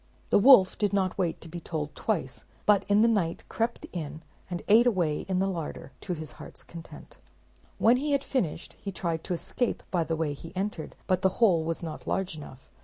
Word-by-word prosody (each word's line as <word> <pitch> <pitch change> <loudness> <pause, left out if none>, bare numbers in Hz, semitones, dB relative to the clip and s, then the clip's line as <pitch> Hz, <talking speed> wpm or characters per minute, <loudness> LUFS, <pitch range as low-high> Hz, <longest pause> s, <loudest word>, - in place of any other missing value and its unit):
The - - +6
wolf 200 -5 +7
did 205 -2 +1
not 190 -2 +1
wait 170 -3 0
to - - -10
be 175 +2 -6
told 155 -3 -4
twice, 135 - -2 0.2
but 210 -2 +4
in 205 +1 +5
the 230 - +6
night 195 -8 0
crept 230 +1 -2
in, 160 -2 -5 0.3
and 175 -1 -4
ate 230 +4 +6
away 175 -9 0
in 185 - +1
the 190 - +2
larder, 170 -7 -4
to 180 - -3
his 155 -2 -7
heart's - - -10
content. 170 -1 -11 0.6
When 235 +3 +5
he 290 +2 -1
had 280 -1 +2
finished, 190 - -2
he 200 - -4
tried 170 -3 -2
to 180 - -1
escape 245 +7 -2
by 175 -3 +2
the 165 0 -2
way 155 -2 -1
he 165 +5 -11
entered, 190 -4 -3
but 185 -1 +1
the 190 - +4
hole 185 -9 +4
was 165 +1 -3
not 160 -2 -6
large 190 -4 -1
enough. 135 -4 -11
180 Hz, 210 wpm, -28 LUFS, 160-205 Hz, 0.6 s, wolf